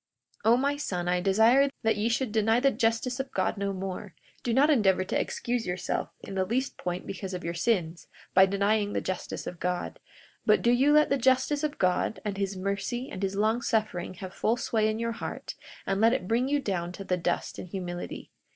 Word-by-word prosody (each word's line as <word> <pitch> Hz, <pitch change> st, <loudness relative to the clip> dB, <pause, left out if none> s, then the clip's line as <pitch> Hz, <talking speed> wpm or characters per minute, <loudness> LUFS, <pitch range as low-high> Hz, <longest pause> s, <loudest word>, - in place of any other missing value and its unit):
42:30 225 Hz, -, +5 dB
O -, -, +5 dB
my 280 Hz, +2 st, +1 dB
son, 180 Hz, -11 st, -3 dB
I 180 Hz, 0 st, +2 dB
desire 225 Hz, +9 st, +5 dB
that 225 Hz, -, +3 dB
ye 210 Hz, +3 st, 0 dB
should 235 Hz, 0 st, 0 dB
deny 225 Hz, +1 st, +3 dB
the 275 Hz, +2 st, +3 dB
justice 230 Hz, +3 st, 0 dB
of 270 Hz, 0 st, -3 dB
God 185 Hz, -, 0 dB
no 200 Hz, 0 st, -2 dB
more. 190 Hz, 0 st, -5 dB, 0.3 s
Do 240 Hz, -, -1 dB
not 280 Hz, +6 st, +4 dB
endeavor 195 Hz, -8 st, +3 dB
to -, -, 0 dB
excuse 240 Hz, -1 st, -2 dB
yourself 180 Hz, +1 st, -2 dB
in -, -, -8 dB
the 190 Hz, -1 st, +1 dB
least 250 Hz, +8 st, -1 dB
point 180 Hz, 0 st, -4 dB
because 190 Hz, -1 st, -5 dB
of 180 Hz, -, -6 dB
your 170 Hz, -, -2 dB
sins, 175 Hz, -3 st, -1 dB, 0.3 s
by 190 Hz, +1 st, +7 dB
denying 205 Hz, +1 st, +1 dB
the -, -, 0 dB
justice 185 Hz, -1 st, -4 dB
of 175 Hz, -, -6 dB
God; 180 Hz, 0 st, -2 dB, 0.4 s
but 215 Hz, -, +3 dB
do 235 Hz, -, +4 dB
you 265 Hz, +4 st, +4 dB
let 300 Hz, -1 st, +5 dB
the 275 Hz, -, +2 dB
justice 260 Hz, +4 st, +2 dB
of 300 Hz, -1 st, -2 dB
God, 185 Hz, +3 st, +1 dB
and 205 Hz, -2 st, -2 dB
his 195 Hz, -1 st, -2 dB
mercy, 200 Hz, +7 st, -2 dB
and 185 Hz, -, -6 dB
his 195 Hz, 0 st, -1 dB
long 220 Hz, +4 st, +1 dB
suffering 215 Hz, -6 st, -1 dB
have 190 Hz, -1 st, -8 dB
full 230 Hz, +2 st, +1 dB
sway 220 Hz, -3 st, +1 dB
in 215 Hz, -, -1 dB
your 230 Hz, 0 st, -1 dB
heart; 230 Hz, -, -6 dB, 0.3 s
and 195 Hz, +1 st, 0 dB
let 225 Hz, +2 st, +5 dB
it 180 Hz, -, -2 dB
bring 235 Hz, +4 st, +1 dB
you 290 Hz, +1 st, +2 dB
down 175 Hz, -8 st, -2 dB
to 195 Hz, -, -7 dB
the 185 Hz, -, 0 dB
dust 175 Hz, 0 st, -2 dB
in -, -, -7 dB
humility. 175 Hz, -1 st, -6 dB
210 Hz, 220 wpm, -28 LUFS, 185-240 Hz, 0.4 s, by